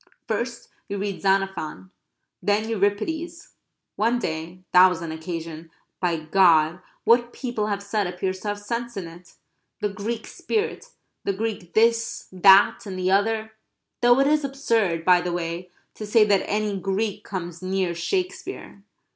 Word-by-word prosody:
First 235 Hz, +2 st, -3 dB, 0.2 s
you 200 Hz, -, -3 dB
read 200 Hz, -1 st, -3 dB
Xenophon; 190 Hz, -, -1 dB, 0.5 s
then 205 Hz, +2 st, +1 dB
Euripides. 230 Hz, -, -1 dB, 0.5 s
One 230 Hz, +3 st, +2 dB
day 170 Hz, -2 st, -5 dB
that 180 Hz, +1 st, +8 dB
was 175 Hz, -2 st, -2 dB
an 165 Hz, -, -4 dB
occasion, 165 Hz, 0 st, -6 dB, 0.3 s
by 175 Hz, -2 st, +1 dB
God 160 Hz, 0 st, +4 dB, 0.2 s
what 240 Hz, +1 st, +4 dB
people 240 Hz, -5 st, -3 dB
have 200 Hz, -1 st, -2 dB
said 200 Hz, -1 st, -1 dB
appears 185 Hz, +1 st, -3 dB
to 210 Hz, -, -7 dB
have 205 Hz, 0 st, -1 dB
sense 235 Hz, +2 st, -4 dB
in 185 Hz, -3 st, -4 dB
it; 170 Hz, +1 st, -14 dB, 0.4 s
"the 210 Hz, -, 0 dB
Greek 215 Hz, +3 st, -4 dB
spirit"; 455 Hz, +2 st, -3 dB, 0.3 s
the 200 Hz, -, 0 dB
Greek 205 Hz, -4 st, -4 dB
this, 230 Hz, +1 st, +2 dB
that, 195 Hz, +3 st, +6 dB
and 190 Hz, -1 st, -5 dB
the 185 Hz, 0 st, 0 dB
other; 220 Hz, +2 st, +1 dB, 0.5 s
though 245 Hz, +1 st, +5 dB
it 275 Hz, -, +4 dB
is 300 Hz, +1 st, +3 dB
absurd, 230 Hz, -, 0 dB
by 180 Hz, -1 st, +6 dB
the 180 Hz, 0 st, -2 dB
way, 175 Hz, +1 st, -4 dB, 0.2 s
to 215 Hz, -, -7 dB
say 215 Hz, +1 st, +5 dB
that 200 Hz, -2 st, +2 dB
any 210 Hz, -1 st, 0 dB
Greek 200 Hz, +2 st, -2 dB
comes 175 Hz, -3 st, -6 dB
near 185 Hz, -1 st, -1 dB
Shakespeare. 370 Hz, -, -4 dB
200 Hz, 155 wpm, -24 LUFS, 180-225 Hz, 0.5 s, that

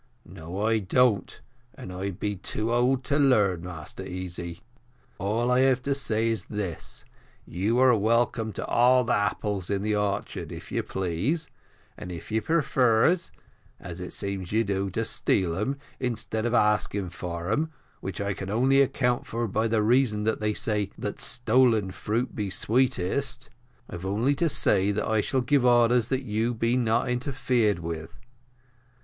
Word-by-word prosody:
"No, 90 Hz, +6 st, -5 dB
I 110 Hz, 0 st, +2 dB
don't 110 Hz, +2 st, +1 dB, 0.4 s
and 90 Hz, -, -8 dB
I 95 Hz, +2 st, -3 dB
be 105 Hz, +2 st, -3 dB
too 110 Hz, +5 st, -2 dB
old 125 Hz, +2 st, +2 dB
to 145 Hz, +2 st, 0 dB
learn, 105 Hz, -, +3 dB
Master 85 Hz, -3 st, -7 dB
Easy. 90 Hz, -1 st, -5 dB, 0.6 s
All 115 Hz, +5 st, 0 dB
I 125 Hz, -, +4 dB
have 130 Hz, -1 st, +3 dB
to 140 Hz, -, +1 dB
say 115 Hz, -5 st, +1 dB
is 115 Hz, -2 st, -2 dB
this, 100 Hz, -6 st, -4 dB, 0.4 s
you 100 Hz, +7 st, -1 dB
are 130 Hz, -1 st, +6 dB
welcome 115 Hz, +1 st, +1 dB
to -, -, -4 dB
all 125 Hz, +1 st, +4 dB
the 115 Hz, -, 0 dB
apples 105 Hz, -2 st, -1 dB
in 100 Hz, -1 st, -1 dB
the 105 Hz, 0 st, +1 dB
orchard 100 Hz, -1 st, -2 dB
if -, -, -9 dB
you -, -, 0 dB
please, 95 Hz, -, -2 dB, 0.5 s
and 90 Hz, -, -7 dB
if 85 Hz, +4 st, -8 dB
you 110 Hz, +1 st, +1 dB
prefers, 140 Hz, +1 st, +2 dB, 0.5 s
as 85 Hz, +1 st, -8 dB
it 90 Hz, -, -6 dB
seems 100 Hz, -3 st, -4 dB
you 110 Hz, +2 st, +2 dB
do, 100 Hz, -1 st, -1 dB
to 110 Hz, +5 st, -2 dB
steal 95 Hz, -4 st, +1 dB
them, 120 Hz, +10 st, -2 dB, 0.2 s
instead 120 Hz, -2 st, -1 dB
of 120 Hz, -, 0 dB
asking 105 Hz, -4 st, +1 dB
for 85 Hz, +1 st, -5 dB
them, 160 Hz, +7 st, 0 dB, 0.3 s
which 95 Hz, -3 st, -5 dB
I 100 Hz, 0 st, -1 dB, 0.2 s
only 130 Hz, +6 st, +3 dB
can 140 Hz, -, +7 dB
account 125 Hz, -2 st, -1 dB
for 115 Hz, +1 st, -2 dB
by 110 Hz, +3 st, 0 dB
the 110 Hz, -1 st, +1 dB
reason 115 Hz, -2 st, +2 dB
that 110 Hz, +1 st, 0 dB
they 105 Hz, 0 st, -1 dB
say, 105 Hz, -2 st, 0 dB
that 105 Hz, -, -4 dB
`stolen 120 Hz, -4 st, +2 dB
fruit 115 Hz, +6 st, -2 dB
be 105 Hz, -3 st, -2 dB
sweetest,' 115 Hz, -2 st, 0 dB, 0.4 s
I've 90 Hz, +2 st, -6 dB
only 110 Hz, +8 st, +1 dB
to 165 Hz, +4 st, +1 dB
say 100 Hz, -8 st, +2 dB
that 105 Hz, -, -1 dB
I 110 Hz, -1 st, +2 dB
shall 130 Hz, +4 st, 0 dB
give 140 Hz, +1 st, +2 dB
orders 120 Hz, -1 st, +4 dB
that 130 Hz, +1 st, -1 dB
you 115 Hz, +1 st, -1 dB
be 115 Hz, +2 st, +1 dB
not 120 Hz, -1 st, +1 dB
interfered 125 Hz, -, 0 dB
with. 80 Hz, -1 st, -6 dB
110 Hz, 165 wpm, -26 LUFS, 100-125 Hz, 0.6 s, can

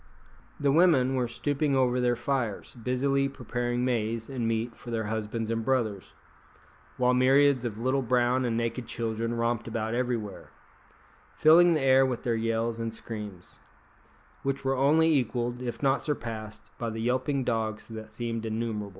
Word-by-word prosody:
The 140 Hz, -1 st, +2 dB
women 145 Hz, -5 st, +4 dB
were 125 Hz, -2 st, 0 dB
stooping 145 Hz, +3 st, -1 dB
over 125 Hz, -1 st, +2 dB
their 120 Hz, -1 st, +2 dB
fires, 125 Hz, -6 st, -2 dB
busily 135 Hz, +3 st, 0 dB
preparing 120 Hz, -1 st, -2 dB
maize 115 Hz, -1 st, -1 dB
and 125 Hz, -4 st, -2 dB
meat 115 Hz, +1 st, -1 dB
for 120 Hz, -, -11 dB
their 115 Hz, -1 st, -1 dB
husbands 110 Hz, +1 st, -3 dB
and 115 Hz, 0 st, -1 dB
brothers; 110 Hz, -7 st, -1 dB, 0.8 s
while 125 Hz, 0 st, +3 dB
myriads 130 Hz, 0 st, +4 dB
of 110 Hz, -3 st, -3 dB
little 130 Hz, +4 st, +1 dB
brown 125 Hz, +1 st, +2 dB
and 115 Hz, -2 st, 0 dB
naked 115 Hz, +1 st, -2 dB
children 115 Hz, 0 st, -2 dB
romped 115 Hz, 0 st, -1 dB
about 110 Hz, 0 st, -2 dB
everywhere, 120 Hz, -5 st, -3 dB, 0.9 s
filling 170 Hz, +2 st, +6 dB
the 155 Hz, -, 0 dB
air 135 Hz, 0 st, +5 dB
with 130 Hz, -3 st, -1 dB
their 120 Hz, -, 0 dB
yells 115 Hz, 0 st, -1 dB
and 115 Hz, 0 st, -3 dB
screams, 105 Hz, -6 st, -8 dB, 0.8 s
which 135 Hz, 0 st, -2 dB
were 135 Hz, 0 st, +2 dB
only 155 Hz, +4 st, +4 dB
equalled, 120 Hz, -1 st, -1 dB
if 125 Hz, +2 st, -5 dB
not 135 Hz, 0 st, +3 dB
surpassed, 115 Hz, -7 st, -5 dB
by 115 Hz, -, -2 dB
the 110 Hz, 0 st, -5 dB
yelping 130 Hz, +3 st, 0 dB
dogs 110 Hz, -2 st, -2 dB
that 110 Hz, -1 st, -8 dB
seemed 115 Hz, 0 st, -4 dB
innumerable. 110 Hz, -2 st, -3 dB
120 Hz, 160 wpm, -28 LUFS, 115-130 Hz, 0.9 s, filling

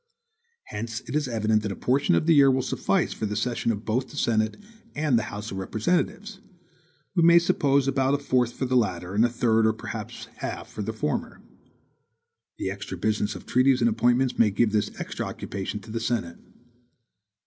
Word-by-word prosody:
Hence 110 Hz, +1 st, -5 dB
it -, -, -7 dB
is 150 Hz, -2 st, +1 dB
evident 110 Hz, -2 st, +1 dB
that 105 Hz, -1 st, -3 dB
a -, -, -4 dB
portion 135 Hz, +3 st, +2 dB
of -, -, +1 dB
the 165 Hz, -, +5 dB
year 140 Hz, -2 st, +7 dB
will 130 Hz, -1 st, +2 dB
suffice 130 Hz, -, 0 dB
for 110 Hz, -, -3 dB
the 105 Hz, -, -3 dB
session 115 Hz, +1 st, 0 dB
of 105 Hz, 0 st, -5 dB
both 125 Hz, +4 st, -1 dB
the 145 Hz, -, -11 dB
Senate 110 Hz, -4 st, +1 dB, 0.4 s
and 150 Hz, -3 st, +1 dB
the 105 Hz, -, -4 dB
House 105 Hz, +1 st, -6 dB
of 95 Hz, -, -5 dB
Representatives; 180 Hz, -, -1 dB, 0.8 s
we 175 Hz, -, +3 dB
may 170 Hz, +1 st, +7 dB
suppose 140 Hz, -6 st, +2 dB
about 135 Hz, 0 st, +2 dB
a -, -, +1 dB
fourth 130 Hz, -4 st, +1 dB
for 130 Hz, -, -3 dB
the 130 Hz, 0 st, 0 dB
latter 95 Hz, -6 st, 0 dB
and 105 Hz, +3 st, +3 dB
a 120 Hz, -, +3 dB
third, 115 Hz, -2 st, +2 dB
or 110 Hz, -, +2 dB
perhaps 110 Hz, -, -7 dB
half, -, -, -5 dB
for 105 Hz, -, -6 dB
the 110 Hz, +2 st, -2 dB
former. 110 Hz, -9 st, -3 dB, 1.2 s
The 95 Hz, -, -2 dB
extra 100 Hz, -1 st, -6 dB
business 105 Hz, +2 st, -1 dB
of -, -, -10 dB
treaties 130 Hz, +1 st, +3 dB
and 120 Hz, -, +4 dB
appointments 120 Hz, +3 st, +1 dB
may 110 Hz, -, +5 dB
give 105 Hz, +2 st, +1 dB
this 105 Hz, -1 st, +1 dB
extra -, -, -4 dB
occupation 100 Hz, +1 st, -5 dB
to 110 Hz, -, -11 dB
the 115 Hz, -, -2 dB
Senate. 115 Hz, -8 st, -2 dB
115 Hz, 195 wpm, -26 LUFS, 105-135 Hz, 1.2 s, year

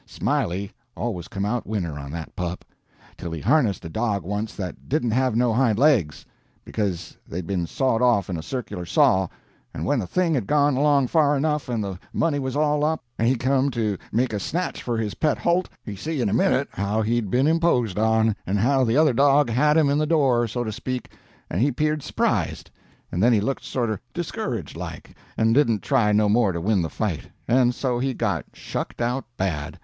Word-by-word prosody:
Smiley 95 Hz, +4 st, -1 dB, 0.3 s
always 95 Hz, -8 st, -3 dB
come 100 Hz, 0 st, -3 dB
out 120 Hz, +3 st, -2 dB
winner 85 Hz, -9 st, -3 dB
on 70 Hz, -1 st, -7 dB
that 80 Hz, +2 st, -7 dB
pup, 90 Hz, 0 st, -4 dB, 0.5 s
till 85 Hz, -, -6 dB
he 80 Hz, -, -4 dB
harnessed 110 Hz, -, +2 dB
a -, -, -5 dB
dog 105 Hz, +2 st, -1 dB
once 105 Hz, +4 st, -3 dB
that 90 Hz, -3 st, -7 dB
didn't 130 Hz, -5 st, +1 dB
have 130 Hz, 0 st, +1 dB
no 120 Hz, -1 st, +2 dB
hind 115 Hz, -3 st, +2 dB
legs, 120 Hz, -, +2 dB, 0.4 s
because 100 Hz, -6 st, -3 dB
they'd 90 Hz, +1 st, -5 dB
been 90 Hz, -1 st, -2 dB
sawed 130 Hz, 0 st, 0 dB
off 120 Hz, -5 st, +3 dB
in 90 Hz, -, -3 dB
a 80 Hz, -, -4 dB
circular 120 Hz, -3 st, -5 dB
saw, 95 Hz, +2 st, +3 dB, 0.5 s
and -, -, -3 dB
when 145 Hz, -2 st, +1 dB
the 95 Hz, -, -3 dB
thing 175 Hz, -, +1 dB
had 120 Hz, -9 st, -1 dB
gone 145 Hz, -2 st, +3 dB
along 140 Hz, 0 st, +3 dB
far 145 Hz, +1 st, +3 dB
enough, 150 Hz, -1 st, -1 dB
and 115 Hz, -3 st, -1 dB
the 95 Hz, -2 st, -5 dB
money 155 Hz, -3 st, +1 dB
was 130 Hz, -1 st, -3 dB
all 150 Hz, 0 st, +2 dB
up, 160 Hz, +1 st, 0 dB, 0.2 s
and 115 Hz, -, +2 dB
he 130 Hz, -, +3 dB
come 130 Hz, +2 st, +1 dB
to 110 Hz, -5 st, -1 dB, 0.2 s
make 120 Hz, +1 st, +1 dB
a 105 Hz, -, -1 dB
snatch 175 Hz, -, -3 dB
for 120 Hz, -2 st, -2 dB
his 110 Hz, -2 st, -2 dB
pet 155 Hz, -2 st, +1 dB
holt, 175 Hz, +2 st, +1 dB, 0.2 s
he 105 Hz, -, -5 dB
see 155 Hz, +9 st, -4 dB
in 120 Hz, -, +1 dB
a -, -, -1 dB
minute -, -, +2 dB
how 100 Hz, +3 st, -1 dB
he'd 115 Hz, -1 st, 0 dB
been 125 Hz, +6 st, +2 dB
imposed 150 Hz, -, +2 dB
on, 110 Hz, -1 st, +3 dB
and 100 Hz, +3 st, +1 dB
how 130 Hz, +6 st, +3 dB
the 120 Hz, +1 st, +2 dB
other 155 Hz, -3 st, +5 dB
dog 140 Hz, 0 st, +4 dB
had 150 Hz, +6 st, +3 dB
him 155 Hz, -3 st, +4 dB
in 140 Hz, +1 st, +2 dB
the 155 Hz, -, +1 dB
door, 135 Hz, -7 st, +3 dB
so 120 Hz, +3 st, -3 dB
to 110 Hz, -, -3 dB
speak, 125 Hz, +3 st, -5 dB, 0.4 s
and 90 Hz, -, -2 dB
he 140 Hz, +3 st, +3 dB
'peared 150 Hz, +3 st, 0 dB
surprised, -, -, -1 dB, 0.4 s
and 90 Hz, -, -1 dB
then 120 Hz, +4 st, +5 dB
he 110 Hz, -, +4 dB
looked 135 Hz, +7 st, -2 dB
sorter 115 Hz, -5 st, -2 dB, 0.2 s
discouraged 160 Hz, -, -4 dB
like -, -, -8 dB, 0.2 s
and 110 Hz, 0 st, +3 dB
didn't 115 Hz, -6 st, +3 dB
try 120 Hz, -7 st, +2 dB
no 105 Hz, 0 st, +3 dB
more 105 Hz, -1 st, +3 dB
to 85 Hz, -, -3 dB
win 100 Hz, +2 st, +1 dB
the 80 Hz, -, -2 dB
fight, 100 Hz, -6 st, -3 dB, 0.2 s
and 125 Hz, 0 st, +3 dB
so 125 Hz, -3 st, -1 dB
he 130 Hz, 0 st, -1 dB
got -, -, -1 dB
shucked -, -, -5 dB
out 120 Hz, +3 st, -1 dB
bad. 80 Hz, -7 st, -2 dB
120 Hz, 210 wpm, -24 LUFS, 100-140 Hz, 0.5 s, other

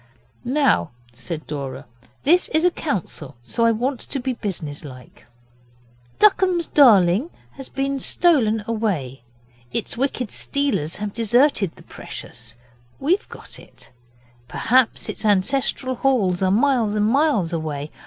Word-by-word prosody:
'Now,' 260 Hz, -, +2 dB, 0.2 s
said 140 Hz, +7 st, -6 dB
Dora, 140 Hz, -3 st, -6 dB, 0.4 s
'this 345 Hz, +6 st, +4 dB
is 320 Hz, +2 st, +3 dB
a 360 Hz, -, +4 dB
council, 175 Hz, -, -4 dB
so 230 Hz, -, 0 dB
I 230 Hz, -, +5 dB
want 245 Hz, +3 st, -1 dB
to 275 Hz, -, -4 dB
be 260 Hz, +1 st, -2 dB
business 165 Hz, -10 st, -5 dB
like. 130 Hz, -4 st, -13 dB, 0.9 s
The -, -, +5 dB
Duckums 360 Hz, -4 st, 0 dB
Darling 215 Hz, -, +5 dB, 0.2 s
has 270 Hz, -1 st, -10 dB
been 275 Hz, 0 st, -2 dB
stolen 245 Hz, -11 st, +2 dB
away; 190 Hz, -, -2 dB, 0.5 s
its -, -, -2 dB
wicked 255 Hz, -3 st, -2 dB
stealers 280 Hz, -, -1 dB
have 205 Hz, 0 st, -5 dB
deserted 230 Hz, -, +2 dB
the -, -, -16 dB
Precious. -, -, -9 dB, 0.4 s
We've 350 Hz, +9 st, 0 dB
got -, -, -11 dB
it. -, -, -17 dB, 0.6 s
Perhaps 250 Hz, 0 st, +1 dB
its -, -, -4 dB
ancestral 245 Hz, +6 st, +1 dB
halls 230 Hz, -9 st, +1 dB
are 190 Hz, -, +2 dB
miles 230 Hz, 0 st, +2 dB
and 210 Hz, 0 st, +2 dB
miles 230 Hz, -, +2 dB
away. 155 Hz, -2 st, -4 dB
230 Hz, 135 wpm, -22 LUFS, 175-275 Hz, 0.9 s, I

